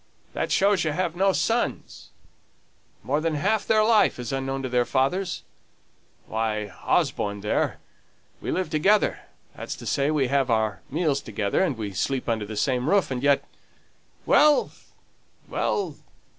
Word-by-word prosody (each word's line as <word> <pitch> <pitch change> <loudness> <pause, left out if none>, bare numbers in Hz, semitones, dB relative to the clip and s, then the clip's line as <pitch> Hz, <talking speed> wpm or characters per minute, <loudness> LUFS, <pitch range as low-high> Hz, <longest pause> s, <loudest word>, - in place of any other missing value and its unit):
"That - - -2
shows 195 -2 +3
you've 165 +2 -1
no 195 +2 +3
sons. 230 +5 -2 0.9
More 150 - 0
than 160 -1 0
half 205 +8 0
their 215 -1 +4
life 220 -1 +4
is 125 +2 -5
unknown 135 0 -2
to 130 - -3
their 125 0 +2
fathers. 140 +9 -1 0.8
Why, 105 -2 -2
Osborne 100 0 0
there, 105 - 0 0.6
we - - -5
live 185 0 -1
together 195 +7 +2 0.4
that's - - -6
to - - -11
say, 140 +1 +1
we 150 -3 +2
have 140 -2 +1
our 110 -3 0
meals 150 -1 0
together, 105 -3 -1
and 155 -10 0
we 105 -3 -4
sleep 130 +8 -2
under 110 -3 -1
the 110 0 -6
same 125 +5 0
roof 195 -7 +2
and 125 -1 -2
yet 140 0 +3 0.8
Well! 300 -1 +4 0.8
well! 410 - -2
140 Hz, 145 wpm, -25 LUFS, 115-185 Hz, 0.9 s, their